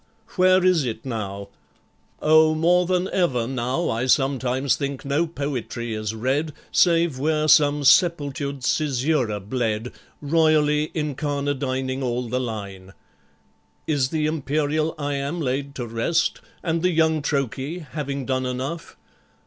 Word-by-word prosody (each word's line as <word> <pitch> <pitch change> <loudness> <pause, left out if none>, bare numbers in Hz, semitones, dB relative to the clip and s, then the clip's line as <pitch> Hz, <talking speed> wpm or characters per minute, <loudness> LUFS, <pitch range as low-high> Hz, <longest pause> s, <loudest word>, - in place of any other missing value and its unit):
Where 185 0 +4
is 180 -5 +4
it 115 -2 -5
now? 100 -5 -5 0.7
Oh, 155 0 +5
more 175 +2 +3
than 185 0 +1
ever, 135 -11 +1
now 130 +6 -2
I 115 +3 -1
sometimes 130 0 +1
think 140 -1 -4
no 145 +5 +1
poetry 130 -6 -4
is 110 0 -3
read 135 +7 -1 0.2
Save 170 -5 +3
where 155 +1 +1
some 145 -1 +4
sepultured 140 -3 +2
Caesura 135 -6 0
bled, 110 +2 -2 0.3
Royally 150 -1 +2
incarnadining 140 -3 -2
all 125 -1 -2
the 125 +2 -1
line. 100 -5 -6 0.9
Is 140 -4 +1
the 155 0 -1
imperial 155 +1 -1
iamb 145 +2 -3
laid 140 -1 -2
to 125 - -4
rest, 115 +9 0 0.2
And 165 -1 0
the 180 - +2
young 160 -2 +2
trochee, 140 +4 -2
having 140 -2 -4
done 130 0 -1
enough? 135 +7 -5
140 Hz, 125 wpm, -23 LUFS, 125-155 Hz, 0.9 s, Oh